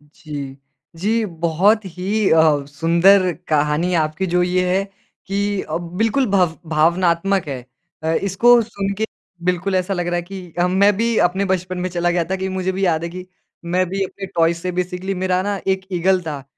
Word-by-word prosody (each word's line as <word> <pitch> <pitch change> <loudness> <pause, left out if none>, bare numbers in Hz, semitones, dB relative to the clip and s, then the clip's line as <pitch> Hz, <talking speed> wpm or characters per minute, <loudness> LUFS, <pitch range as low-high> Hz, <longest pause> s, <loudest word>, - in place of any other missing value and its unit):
जी। 140 -3 -7 0.4
जी, 220 +6 0
बहुत 180 +4 +1
ही 190 +4 -1
अ, 155 -3 +4
सुंदर 170 +5 +4 0.2
कहानी 150 +4 +1
आपकी 155 +3 0
जो 180 +1 +1
ये 180 0 +1
है 195 - +1 0.4
कि 200 0 -1
अ, 155 - -3
बिल्कुल 215 +10 0
भव 180 -4 +2
भावनात्मक 170 +3 +2
है। 135 -3 -4 0.4
अ, 160 +1 +1
इसको 230 +7 +4
सुन 200 -3 -3
के 220 - 0 0.4
बिल्कुल 180 +2 0
ऐसा 185 +2 0
लग 175 -1 -2
रहा 175 - 0
है 175 - 0
कि 180 -1 -10
हम 180 +1 +2
मैं 205 +1 +7
भी 230 0 +1
अपने 190 +3 -2
बचपन 185 -1 -2
में 185 +1 -2
चला 175 0 0
गया 170 -1 +1
था - - +2
कि, 190 0 -3
मुझे 185 0 -1
भी 190 +1 -1
याद 160 -2 +1
है 170 - -3
कि 180 +1 -8 0.5
मैं 185 0 +3
भी 195 +1 -1
अपने 195 +1 -6
टॉय 165 0 +3
से 175 +2 -4
बेसिकली 180 +2 -3
मेरा 185 0 +1
ना 200 -1 -2
एक 190 0 0
ईगल 185 +1 +2
था, 150 -5 -6
180 Hz, 190 wpm, -20 LUFS, 170-195 Hz, 0.5 s, मैं